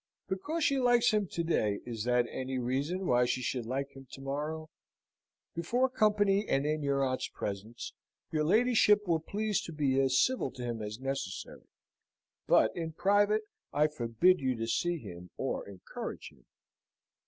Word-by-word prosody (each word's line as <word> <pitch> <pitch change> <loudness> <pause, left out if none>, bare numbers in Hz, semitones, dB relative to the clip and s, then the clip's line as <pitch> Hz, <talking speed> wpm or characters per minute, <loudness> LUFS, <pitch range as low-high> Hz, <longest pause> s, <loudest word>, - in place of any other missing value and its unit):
Because 295 - -2
she 275 -2 +3
likes 245 -2 +4
him 210 -2 +1
to 170 - -3
day, 105 -11 +1
is 115 -2 -4
that 125 0 +3
any 130 0 -3
reason 140 +10 -1
why 125 -5 +4
she 125 +1 -1
should 125 -3 -2
like 135 +3 -2
him 135 -1 -12
to - - -8
morrow? 150 +3 -4 0.8
Before 240 +11 +1
company, 205 -3 +3
and 135 +1 +2
in 155 +1 0
your 140 -1 +1
aunt's 130 -1 -1
presence, 105 +4 -6 0.4
your 155 -1 +1
ladyship 210 +2 +4
will 165 -2 +2
please 210 +5 -1
to - - -7
be 140 -4 +1
as 130 -1 +3
civil 255 - +2
to 125 - -7
him 120 -2 -3
as 105 +2 -5
necessary; 135 -9 -5 0.8
but, - - +4
in 165 -2 -4
private, 205 +4 +3 0.3
I 150 +1 +3
forbid 150 +6 +2
you 130 -2 0
to 115 0 -3
see 175 +9 0
him 90 - -10
or - - -3
encourage 95 -2 -7
him." - - -25
150 Hz, 165 wpm, -31 LUFS, 125-195 Hz, 0.8 s, likes